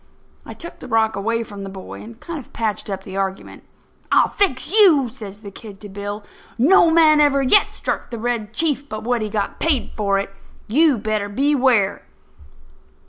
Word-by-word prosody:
I - - -8
took 340 - -10
the - - -10
rock 220 -1 +1
away 230 +3 -1
from 205 -2 -9
the 195 - -6
boy 190 -1 -9
and 230 +1 -12
kind 335 -3 -6
of 260 - -14
patched 215 -2 -2
up 190 -1 -4
the 190 0 -8
argument. 195 0 -4 0.5
"I'll - - +4
fix 285 -8 0
you," 350 - +5
says 210 -4 -10
the 200 -2 -9
kid 200 0 -11
to 205 - -9
Bill. 205 +1 -6 0.3
"No 330 +7 +5
man 320 -2 +5
ever 280 -2 +3
yet 330 +10 +5
struck - - -4
the 235 - -6
Red 225 -2 -3
Chief 285 +2 -1
but 215 0 -6
what 240 0 0
he 215 - -3
got 205 -1 -3
paid 300 -7 0
for 200 -2 0
it. 195 0 -4 0.3
You 290 +3 +3
better 215 -1 -2
beware!" 255 -4 +2
225 Hz, 190 wpm, -20 LUFS, 205-280 Hz, 0.5 s, you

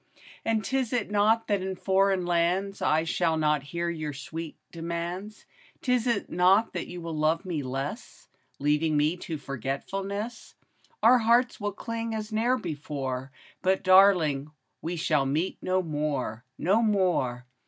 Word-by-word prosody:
And 225 -1 +1
't 265 - -2
is 255 -2 0 0.2
not 215 +2 +3
that 205 -3 0
in 190 0 -3
foreign 190 0 +2
lands 180 +3 0
I 155 +1 +3
shall 165 0 +1
not 150 -2 +2
hear 170 +5 -3
your 155 -3 -3
sweet 160 +3 -7
demands, 170 +5 -5 0.4
'T 250 - +2
is 235 -3 +1
not 190 +5 +3
that - - -3
you 175 0 -7
will 165 -1 -5
love 155 +4 +1
me 170 -5 -2
less. 135 +2 -5 0.3
Leaving 150 +2 +1
me 150 +3 +2
to 165 -2 -5
forgetfulness, 195 - -4 0.2
— - - -35
Our 245 +3 +7
hearts 240 +2 +3
will 205 0 -1
cling 230 +1 -4
as 215 0 -5
ne'er 240 +4 +2
before, 140 - -4 0.3
But, 190 0 +1
darling, 180 -7 +5 0.3
we 170 +2 -3
shall 150 -4 +1
meet 155 +7 -1
no 185 0 +1
more, 145 -7 -2
No 200 +6 +3
more 180 - +1
175 Hz, 155 wpm, -27 LUFS, 150-205 Hz, 0.4 s, Our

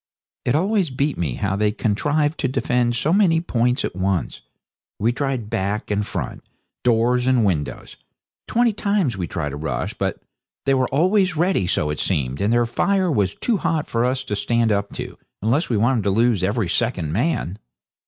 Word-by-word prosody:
It 125 - +2
always 190 +1 +1
beat 140 +2 -1
me 75 -8 -2
how 95 -1 -1
they 105 +1 +2
contrived 145 +9 0
to 140 - +1
defend 125 -2 0
so 150 +7 +1
many 185 -5 +4
points 125 -5 0
at - - -5
once. 95 -1 -1 0.6
We 115 +3 +2
tried 130 -3 -2
back 100 +3 -2
and 105 0 +1
front, - - -5 0.4
doors 125 +1 +2
and 125 -4 +3
windows. 80 -7 -2 0.5
Twenty 235 -1 +2
times 200 - 0
we 90 -3 -3
tried 75 -4 -3
a - - -5
rush, 80 +2 -3
but - - -2 0.5
they 135 - +3
were 130 -1 +2
always 185 +4 +2
ready 175 - +2
so 75 -3 0
it 75 - -4
seemed 70 -6 -1
and 100 +2 +2
their 120 0 +3
fire 185 +9 +1
was 100 -7 +1
too 235 -4 0
hot 160 -4 -1
for 115 0 0
us 130 +1 0
to 105 -5 -3
stand 115 +2 +1
up 100 -1 0
to, - - -7 0.2
unless 130 +10 +1
we 115 - +1
wanted 115 +1 +2
to - - +3
lose 115 0 +2
every 100 +1 0
second 90 -6 -1
man. 110 - -1
120 Hz, 185 wpm, -22 LUFS, 100-150 Hz, 0.6 s, many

